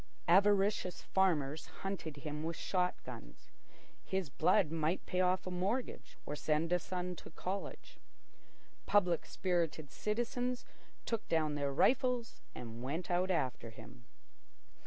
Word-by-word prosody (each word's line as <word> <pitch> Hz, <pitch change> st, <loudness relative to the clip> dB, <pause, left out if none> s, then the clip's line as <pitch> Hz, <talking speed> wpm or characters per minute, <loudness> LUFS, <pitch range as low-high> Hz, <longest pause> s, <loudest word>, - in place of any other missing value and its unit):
Avaricious 195 Hz, 0 st, +4 dB
farmers 160 Hz, -6 st, +1 dB, 0.2 s
hunted 185 Hz, -6 st, -3 dB
him 150 Hz, +1 st, -4 dB
with 165 Hz, +1 st, -2 dB
shot 180 Hz, 0 st, +1 dB
guns. -, -, -10 dB, 0.5 s
His 190 Hz, -7 st, -2 dB
blood 185 Hz, +2 st, +3 dB
might 165 Hz, +2 st, 0 dB
pay 185 Hz, -, +1 dB
off 185 Hz, 0 st, +2 dB
a 185 Hz, -, -3 dB
mortgage 195 Hz, +8 st, -2 dB
or 150 Hz, -, -3 dB
send 155 Hz, +3 st, +1 dB
a 180 Hz, -, +4 dB
son 180 Hz, 0 st, -3 dB
to -, -, -10 dB
college. 190 Hz, +4 st, -5 dB, 0.9 s
Public 180 Hz, -5 st, +3 dB
spirited 165 Hz, -5 st, -1 dB
citizens 245 Hz, +3 st, -1 dB, 0.4 s
took 230 Hz, -2 st, -2 dB
down 155 Hz, -2 st, +2 dB
their 145 Hz, -1 st, 0 dB
rifles 250 Hz, -, +2 dB
and 115 Hz, -1 st, -7 dB
went 155 Hz, +8 st, -3 dB
out 180 Hz, +2 st, +2 dB
after 130 Hz, -9 st, 0 dB
him. 120 Hz, +2 st, -13 dB
180 Hz, 130 wpm, -35 LUFS, 155-195 Hz, 0.9 s, Avaricious